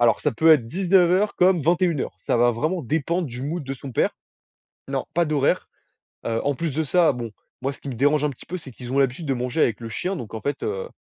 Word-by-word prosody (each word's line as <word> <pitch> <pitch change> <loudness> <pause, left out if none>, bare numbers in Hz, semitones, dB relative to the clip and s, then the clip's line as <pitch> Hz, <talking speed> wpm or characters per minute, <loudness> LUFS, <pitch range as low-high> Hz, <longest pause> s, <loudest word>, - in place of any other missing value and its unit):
alors 120 -1 +4
ça - - +1
peut 160 +8 +4
être 140 -8 +5
19:00, 185 - +3
comme 180 -2 +4
21:00. 170 -1 +1
Ça - - 0
va 120 +1 +4
vraiment 155 +9 -1
dépendre 160 +5 -1
du 125 +2 -7
mood 160 +3 -3
de 135 0 -5
son 135 0 -9
père. - - +1 0.7
Non, - - -2
pas 170 0 +3
d'horaire. 150 -3 +1 0.6
Heu, 115 0 0
en 145 -1 0
plus 160 0 -2
de 160 - +1
ça, 165 +1 +4
bon, 120 -3 -5 0.3
moi 135 +2 -1
ce - - -17
qui 140 - -7
me 125 - -5
dérange 145 +4 +2
un 150 - +2
petit 125 - -14
peu, 185 - -4
c'est 150 -6 -10
qu'ils 125 +1 -9
ont 135 - 0
l'habitude 135 +4 0
de 135 - +2
manger 125 +5 -1
avec 115 -2 +2
le 115 - -6
chien, 185 - -2
donc 115 -8 -7
en 110 - -5
fait, 145 - -3
heu, 475 +3 -3
145 Hz, 250 wpm, -23 LUFS, 125-170 Hz, 0.7 s, être